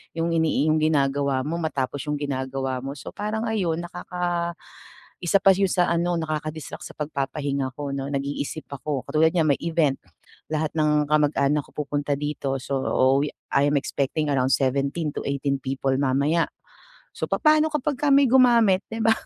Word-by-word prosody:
yung 165 +1 0
inii 160 -2 +2
yung 155 - +2
ginagawa 140 -3 +1
mo, 165 +4 -3
matapos 145 -4 -2
yung 150 - 0
ginagawa 135 -2 -2
mo. 135 +2 -6
So, 130 - -9
parang 215 +2 -3
ayon 175 -6 -1
nakaka 175 -1 -3 0.7
isa 175 +3 +3
pa 195 0 +7
yun 195 0 +1
sa 180 -1 +2
ano, 170 0 0
nakaka-distract 155 -1 -4
sa - - -10
pagpapahinga 140 -2 -2
ko 140 -1 -4
'no, 135 0 -3
nag-iisip 140 +2 -3
ako. 140 -1 -3
Katulad 160 +1 +3
niyan 155 -4 +3
may - - -46
event, 160 -4 +1 0.5
lahat 155 -1 -1
ng 150 -1 +2
kamag-anak 150 -1 +2
ko - - -21
pupunta 145 0 -1
dito, 145 -2 -2
so 135 +1 -4 0.5
we 150 - -1 0.2
I'm 145 +1 +3
expecting 140 +2 -1
around 130 -1 +2
17 140 +3 -1
to - - -3
18 140 -1 -1
people 135 0 -1
mamaya. 140 +5 +1 0.7
So, - - -3
papaano 310 0 +4
kapagka 295 -1 -1
may 280 0 +6
gumamit, 235 -6 +5
di 225 - -6
ba? 225 0 +4
150 Hz, 160 wpm, -24 LUFS, 140-170 Hz, 0.7 s, pa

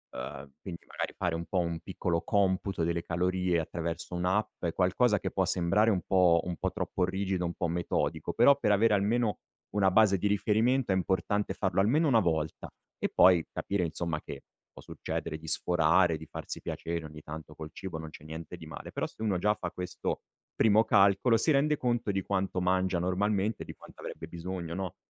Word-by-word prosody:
Uhm, 65 +2 -7
quindi 85 -3 -8
magari - - -4
fare 90 -2 -1
un 85 +1 -3
po' 90 +4 -3
un 85 -1 -1
piccolo 85 +1 -2
computo 95 -3 +1
delle 85 +1 0
calorie 90 +1 0
attraverso 85 +1 -4
un'app 90 +5 -1
è 85 - +1
qualcosa 100 +5 +2
che - - -3
può 95 - +1
sembrare 95 +5 +2
un 95 -5 +1
po' 90 -3 +4
un 90 -1 -3
po' - - -1
troppo - - -2
rigido 95 0 -1
un 85 - -2
po' 85 - -1
metodico 80 -2 -1
però 140 +4 +6
per 105 - +2
avere 110 +2 +4
almeno 105 +2 +1 0.3
una 100 -2 +3
base 100 -1 +4
di 105 - +1
riferimento 110 +4 +2
è - - +3
importante 95 +2 0
farlo 95 -1 0
almeno 145 +11 +3
una 120 -5 +5
volta 80 -5 -1 0.3
e - - 0
poi 90 -3 +5
capire 100 -3 -1
insomma 80 -1 -3
che - - -9 0.3
può - - -13
succedere 80 - -4
di 80 - -11
sforare, 85 +1 +3
di 80 - -11
farsi - - -7
piacere 85 -1 -4
ogni 75 0 -10
tanto 80 0 -9
col 80 - -8
cibo, 95 -4 -6
non 80 0 -7
c'è 75 - -13
niente 80 +1 -8
di - - -11
male. - - -8
Però - - -1
se - - -11
uno 105 -4 +1
già 105 +4 +2
fa 90 -4 -4
questo 90 0 -4 0.3
primo 110 0 +5
calcolo 100 +4 +4
si 135 +8 +2
rende 150 +1 +3
conto 120 -5 0
di 95 0 -1
quanto 95 -2 -1
mangia 95 0 +1
normalmente, 100 +4 0
di - - -9
quanto - - -16
avrebbe 80 - -7
bisogno, 85 0 -5
no, 95 -1 -4
95 Hz, 195 wpm, -30 LUFS, 85-105 Hz, 0.3 s, però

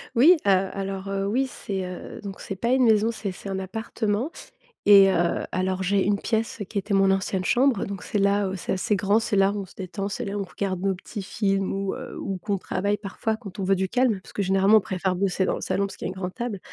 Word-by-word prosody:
Oui, 280 +10 +8
heu, 200 - +5 0.2
alors, 195 0 -4
heu, 195 0 -1
oui. 250 +7 +1
C'est, 195 -6 -4
heu, 180 0 -8
donc 195 -2 -7
c'est 195 - -5
pas 235 +5 -2
une 260 +1 +4
maison, 220 -1 +4
c'est 205 -3 -4
c'est 195 +2 -9
un 195 - -2
appartement 215 - -2 0.6
et 200 -1 +8
heu, 175 -2 +1
alors, 185 +1 0
j'ai 195 +1 +2
une 205 +1 +2
pièce, 225 0 -1
qui 215 - -4
était 200 +1 -1
mon 195 0 +4
ancienne 190 -1 0
chambre 250 -2 +3
donc 195 -2 -6
c'est - - -2
là 200 0 +2
où 190 - -4
c'est 180 - -3
assez 190 +3 +1
grand. 200 +3 +3
C'est 215 -3 -1
là 195 0 +4
où 205 - -3
on - - -6
se - - -18
détend, 195 +1 -4
c'est 240 +4 -4
là 200 0 -3
où - - -1
on - - -1
regarde 185 -1 -3
nos 195 -1 +1
petits 195 +2 -7
films 195 -1 0
ou 195 0 -2
heu, - - -8
ou 195 -1 -3
qu'on 200 +2 -1
travaille 200 +2 -1
parfois 215 +2 -3
quand 205 -4 -10
on - - -1
veut 195 +1 +3
du 190 0 0
calme. 245 -2 +2
Parce - - -15
que - - -1
généralement 195 +2 +5
on 215 - +3
préfère 185 -1 -1
bosser 190 0 +1
dans - - 0
le - - -6
salon 200 - 0
parce - - -10
qu'il - - -7
y - - -3
a - - -5
une - - -20
grande 180 -1 -4
table. 235 -5 -4
195 Hz, 270 wpm, -25 LUFS, 190-210 Hz, 0.6 s, Oui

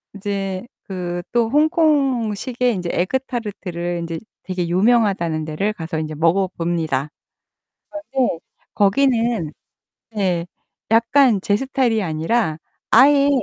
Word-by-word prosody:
이제 195 0 -3 0.2
그 175 -2 -4
또 235 -2 +2
홍콩식의 260 -6 +1
이제 175 -1 -4
에그 185 +9 0
타르트를 180 -7 -4
이제 165 -1 -4 0.2
되게 185 -2 -3
유명하다는 185 -5 +2
데를 175 +8 -1
가서 160 -4 -4
이제 155 -1 -4
먹어봅니다. 165 -4 0 0.8
그런데 270 - -1 0.3
거기는 230 - +2 0.6
예 180 -4 0 0.5
약간 230 -1 +4
제 205 +1 +1
스타일이 255 -3 0
아니라 165 +1 0 0.3
아예 280 +4 +6
200 Hz, 245 characters per minute, -20 LUFS, 170-240 Hz, 0.8 s, 아예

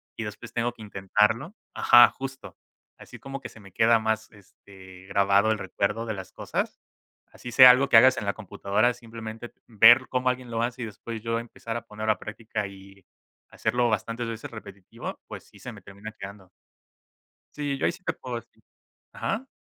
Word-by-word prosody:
y 115 - -5
después 110 +2 -8
tengo 120 0 0
que 115 - -16
intentarlo 105 - 0 0.2
ajá, 120 -1 +7
justo. 135 0 -8 0.4
Así - - -12
como 135 0 -7
que - - -8
se 115 - -16
me 100 -2 -15
queda 115 +1 +4
más, 110 0 -2
este, 95 -2 -16
grabado 100 +2 +3
el 110 - 0
recuerdo 100 +4 -2
de 110 - -2
las 95 -1 -9
cosas. - - -4 0.5
Así 120 - -9
sea 125 +1 +10
algo 135 +2 +2
que 115 - +7
hagas 130 +2 +7
en 105 - -3
la 100 - 0
computadora, 110 +3 0
simplemente 115 0 -9 0.2
ver 120 +3 +7
cómo 130 0 +1
alguien 125 -1 -3
lo 115 0 -1
hace, 125 +1 -3
y - - -2
después 110 +2 -8
yo 115 0 -1
empezar 115 -1 -7
a - - -8
poner 105 +1 -9
a - - -4
la - - -16
práctica 105 -1 -5
y 95 0 -15 0.5
hacerlo 120 -1 0
bastantes 115 +2 -2
veces 115 -1 -6
repetitivo, 100 -4 -9
pues - - -9
sí, - - -19
se - - -8
me - - -13
termina 100 +3 -10
quedando. 95 -1 -10 1.1
Sí, 145 -2 -2
yo - - -1
ahí - - +2
sí 175 +2 -14
te - - -1
puedo 125 -2 -6
decir 115 - -14 0.5
ajá. 230 +4 -3
115 Hz, 195 wpm, -26 LUFS, 100-120 Hz, 1.1 s, sea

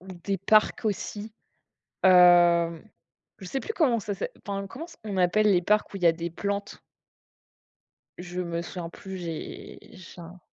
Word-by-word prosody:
ou 190 - -17
des 190 +2 -4
parcs 215 +5 +2
aussi. 210 +1 -4 0.7
Hem, 175 -2 +5 0.6
je 190 - -10
sais 270 +9 -3
plus 445 - -5
comment 255 - +2
ça 205 0 -4
s'est - - -4 0.2
enfin, 200 -1 -4
comment 270 - -8
c 345 - -16
on 205 -2 -4
appelle 195 +4 +3
les 180 -3 +3
parcs 210 +3 +1
où - - -6
il 180 - -4
y 165 - +6
des 170 +1 -5
plantes? 200 +4 -4 1.4
Je 175 0 -6
me 170 -1 -3
souviens 170 -1 -7
plus, 190 +2 -9
j'ai 165 -3 -7 0.2
j'ai 180 -1 -12
un 175 +2 -12
185 Hz, 170 wpm, -26 LUFS, 175-205 Hz, 1.4 s, y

